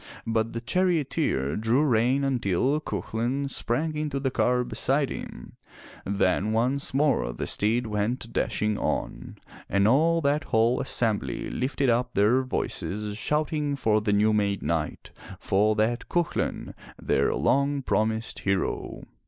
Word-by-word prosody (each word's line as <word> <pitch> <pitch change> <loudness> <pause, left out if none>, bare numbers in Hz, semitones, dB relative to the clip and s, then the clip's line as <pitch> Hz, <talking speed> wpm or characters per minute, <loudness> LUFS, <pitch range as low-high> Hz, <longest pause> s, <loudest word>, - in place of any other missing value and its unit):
But 115 0 -1
the 115 - -4
charioteer 150 - 0
drew 115 +6 +2
rein 130 +1 +2
until 130 - +1
Cuchulain 120 - -2
sprang 150 +8 0
into 150 -2 -2
the 135 -1 -1
car 125 0 +1
beside 135 +3 0
him, - - -8 0.5
then 100 +1 +1
once 130 +5 0
more 135 - +1
the - - -4
steeds 115 +4 +1
went 110 +3 -2
dashing 105 -1 0
on, - - -3 0.3
and 100 +1 +3
all 160 +8 +3
that 145 +1 +1
whole 115 +3 +2
assembly 105 - -1
lifted 135 +1 -1
up 125 +1 -1
their 110 +6 +4
voices 105 -5 -3
shouting 150 +3 -1
for 110 -5 +1
the 105 -1 0
new 105 +1 +3
made 100 -2 0
knight, 80 0 -3 0.3
for 105 +3 +2
that 115 +3 -1
Cuchu 175 -2 0
lain, - - -3 0.3
their - - +1
long 140 0 +1
promised 110 -1 -1
hero. 100 -1 -2
120 Hz, 135 wpm, -26 LUFS, 105-140 Hz, 0.5 s, their